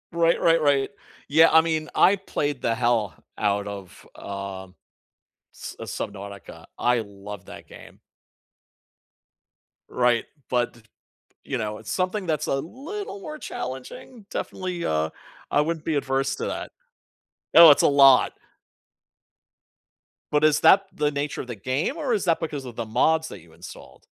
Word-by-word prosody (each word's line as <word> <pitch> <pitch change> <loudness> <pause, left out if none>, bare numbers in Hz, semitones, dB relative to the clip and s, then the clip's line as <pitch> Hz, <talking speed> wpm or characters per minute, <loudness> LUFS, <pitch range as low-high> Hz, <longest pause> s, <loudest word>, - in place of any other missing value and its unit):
Right. 170 0 +2
Right. 165 -1 +4
Right. 140 -2 +2 0.4
Yeah. 160 +3 +6
I 160 - +7
mean, 160 -1 -2
I 200 +2 +5
played 145 -7 -3
the 115 - 0
hell 115 -4 0 0.2
out 100 -1 0
of, 100 -3 -9
um, 95 -1 -7 0.8
s - - -9
uh, - - -6
Subnautica. 100 -1 -7
I 120 -1 +2
love 100 -1 -10
that - - -11
game. - - -14 1.9
Right. 120 -2 +2 0.2
But 120 -1 0
d 120 - -18 0.7
you 135 - -2
know, 105 -1 -3
it's - - -8
something 185 +2 -1
that's 155 -3 -1
a - - +1
little 325 - -6
more 310 -5 -7
challenging, 130 - -8
definitely, 180 -2 -4
uh, 80 0 0 0.4
I 145 - +4
wouldn't 160 +1 -3
be 160 - 0
adverse 135 -1 0
to - - -3
that. - - -5 0.9
Oh, 165 -1 +11
it's 145 - +6
a - - +5
lot. 135 -2 +6 2.0
But 150 +1 +3
is 155 -1 +3
that 195 0 +6
the 150 0 0
nature 145 0 -3
of - - -10
the 120 - -6
game, 130 - -2
or 285 -7 -1
is 210 - 0
that 170 -3 +2
because 150 -4 -4
of 125 -3 -10
the 115 - -3
mods 160 +8 +2
that - - -10
you 85 0 -20
installed? - - -13
140 Hz, 155 wpm, -24 LUFS, 115-165 Hz, 2.0 s, Oh